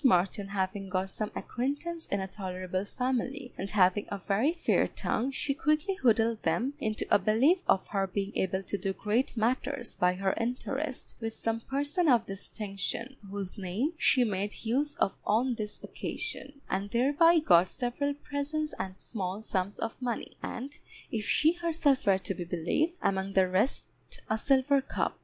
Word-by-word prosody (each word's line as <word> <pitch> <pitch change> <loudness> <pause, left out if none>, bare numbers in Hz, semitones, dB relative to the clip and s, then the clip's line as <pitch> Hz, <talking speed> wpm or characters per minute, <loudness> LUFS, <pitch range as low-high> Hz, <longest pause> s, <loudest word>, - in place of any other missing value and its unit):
Martin 195 -4 +3
having 195 0 -2
got 185 +1 -1
some 215 +1 -3
acquaintance 290 +7 -3
in 200 - 0
a 190 - -3
tolerable 185 -1 -3
family, 255 +3 -2
and 195 - -4
having 195 0 +3
a 200 - -3
very 200 - +1
fair 340 0 +2
tongue, 245 +5 -1
she 275 +1 -1
quickly 305 +7 +1
wheedled 225 -1 +3
them 260 +4 +1
into 215 -5 -1
a - - +7
belief 250 - +4
of 190 - +3
her 195 -1 0
being 195 +2 -3
able 190 +1 0
to 200 - -3
do 195 - -1
great 225 +6 0
matters 245 +2 0
by 180 0 +3
her 190 0 +1
interest 260 +4 -3
with 225 -1 -4
some 225 0 -1
person 290 +7 0
of 240 -5 +5
distinction, 200 +5 -4
whose 200 0 -5
name 200 - -1
she 260 -4 +4
made 205 0 -2
use 280 +6 +1
of - - +1
on 245 +4 +2
this 215 -2 -5
occasion, 280 - -5
and 195 +2 -1
thereby 290 +9 +5
got 180 - +5
several 280 +6 -1
presents 295 +2 -3
and 190 0 -4
small 195 -1 -4
sums 195 -1 -1
of 225 +3 -4
money, 240 -3 -3
and 275 +4 -6 0.3
(if 220 -2 -1
she 310 +1 +4
herself 325 -7 +1
were 195 -1 +6
to 195 - -3
be 180 - -4
believed) 180 - 0
among 190 0 0
the 190 -1 +5
rest 190 +8 +1 0.4
a - - +4
silver 275 +2 +4
cup. 265 - -2
225 Hz, 170 wpm, -30 LUFS, 195-275 Hz, 0.4 s, a